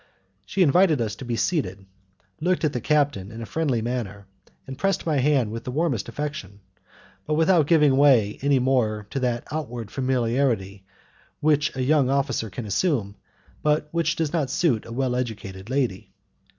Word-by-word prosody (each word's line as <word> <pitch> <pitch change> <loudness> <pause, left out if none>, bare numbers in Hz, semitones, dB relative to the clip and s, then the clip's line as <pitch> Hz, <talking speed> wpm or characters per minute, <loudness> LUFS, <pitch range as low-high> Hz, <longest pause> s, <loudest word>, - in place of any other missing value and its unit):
She 190 - +2
invited 170 -1 +4
us 110 -3 -2
to 130 - -8
be 120 -1 -2
seated, 100 - -1 0.5
looked 180 +3 0
at 155 - +1
the 125 - -3
captain 140 -9 +1
in 115 - -8
a 115 - -5
friendly 135 -5 -1
manner, 110 -5 -4 0.4
and 135 - -7
pressed 195 +7 -1
my 155 -3 +1
hand 135 -5 +2
with 115 +1 -6
the - - -6
warmest 135 - -1
affection, 140 -10 -5 0.7
but 155 - +1
without 160 -1 +3
giving 150 -5 +4
way 130 -7 +4
any 140 0 +3
more 120 -5 +1
to 135 - -2
that 120 -2 -1
outward 125 -8 -5
familiarity 120 -6 0 0.6
which 150 -2 +2
a 130 - -1
young 140 -1 +3
officer 135 -5 0
can 115 +4 -6
assume, 105 - 0 0.5
but 150 0 +1
which 170 0 0
does 160 -2 -2
not 150 -6 0
suit 145 -7 +1
a - - -9
well 125 +1 -1
educated 105 -5 -5
lady. 130 -8 -1
130 Hz, 170 wpm, -24 LUFS, 115-150 Hz, 0.7 s, invited